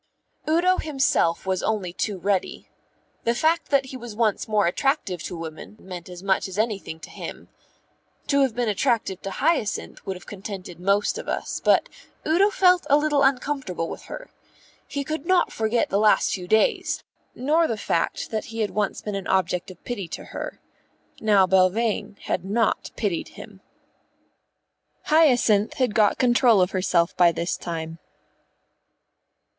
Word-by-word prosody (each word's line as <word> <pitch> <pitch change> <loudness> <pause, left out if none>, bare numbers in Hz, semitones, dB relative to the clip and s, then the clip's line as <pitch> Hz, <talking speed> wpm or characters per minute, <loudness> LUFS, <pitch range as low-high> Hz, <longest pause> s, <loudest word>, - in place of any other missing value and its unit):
Udo 360 +3 +3
himself 265 - +1
was 190 -1 0
only 200 -5 -1
too 205 +1 -2
ready. 190 +1 -1 0.6
The 235 +1 +1
fact 325 +5 +1
that 275 -2 +3
he 265 0 -8
was 240 -3 -9
once 215 -2 0
more 210 -2 +2
attractive 190 - 0
to 175 - -5
women 165 +5 -8
meant 180 -2 -9
as 180 0 -10
much 195 0 +1
as 190 0 -8
anything 210 -7 -2
to - - -10
him. - - -8 0.8
To 280 -1 +2
have 260 -5 +1
been 245 -1 0
attractive 215 -3 0
to 195 - -5
Hyacinth 235 - -1
would 190 - -4
have 180 - -12
contented 190 -3 -8
most 200 +3 +1
of - - -7
us, - - -3
but - - +4 0.4
Udo 360 +6 +4
felt 365 -5 +3
a 285 - +6
little 295 -1 +2
uncomfortable 270 -10 0
with - - -8
her. - - -9 0.6
He 280 0 -3
could 310 +2 -5
not 370 -1 +3
forget 220 +2 0
the 200 - +2
last 210 0 +4
few 180 -2 -5
days, 220 +3 +1 0.3
nor 310 +6 +2
the 225 - -2
fact 170 - -1
that 220 -1 -2
he 225 0 -5
had 210 - -1
once 210 -2 -1
been 210 - -5
an 195 -1 -4
object 185 -1 0
of 185 -2 -13
pity 205 -7 -4
to - - -7
her. - - -6 0.6
Now 205 -3 +4
Belvane 200 +3 +1
had 175 - -2
not 215 +3 0
pitied 195 -7 -2
him. 200 -3 -11 1.4
Hyacinth 245 -9 +3
had 250 -5 0
got 210 -2 +3
control 240 -3 +4
of 180 +1 +2
herself 185 -2 +1
by 175 -1 +5
this 170 +1 -2
time. 165 -1 -6
210 Hz, 160 wpm, -24 LUFS, 185-265 Hz, 1.4 s, a